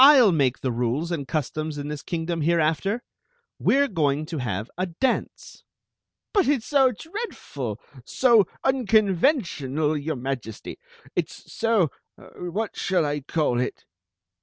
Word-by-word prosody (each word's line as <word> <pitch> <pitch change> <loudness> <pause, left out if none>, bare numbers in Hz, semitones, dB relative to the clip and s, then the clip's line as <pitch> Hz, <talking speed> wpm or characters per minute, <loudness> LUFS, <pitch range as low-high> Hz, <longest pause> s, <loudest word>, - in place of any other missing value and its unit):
7/ 265 -8 +8
make 135 -5 +1
the 130 - 0
rules 125 +8 -1
and 145 -6 -3
customs 155 0 -2
in 145 0 -4
this 150 -2 -5
kingdom 165 -1 -3
hereafter. 170 +7 +1 0.6
We - - +3
re 280 - +4
going 150 - 0
to 155 - -2
have 110 -3 -2
a 185 +2 -1
dance." 245 +10 -2 0.3
" - - -62
But 400 - +3
it 275 -5 +2
s - - -14
so 270 -3 +4
dreadM 235 - -5 0.2
— - - -17
so 235 -7 +4 0.2
unconventional, 195 - +2
your 150 +1 -2
Majesty! 125 -4 -5 0.4
It - - 0
s - - -13
so— 225 -8 +2 0.3
what 195 +5 -5
shall 180 -4 +1
I 145 0 -1
call 135 -4 0
it?" 125 - -3
165 Hz, 150 wpm, -25 LUFS, 145-225 Hz, 0.6 s, 7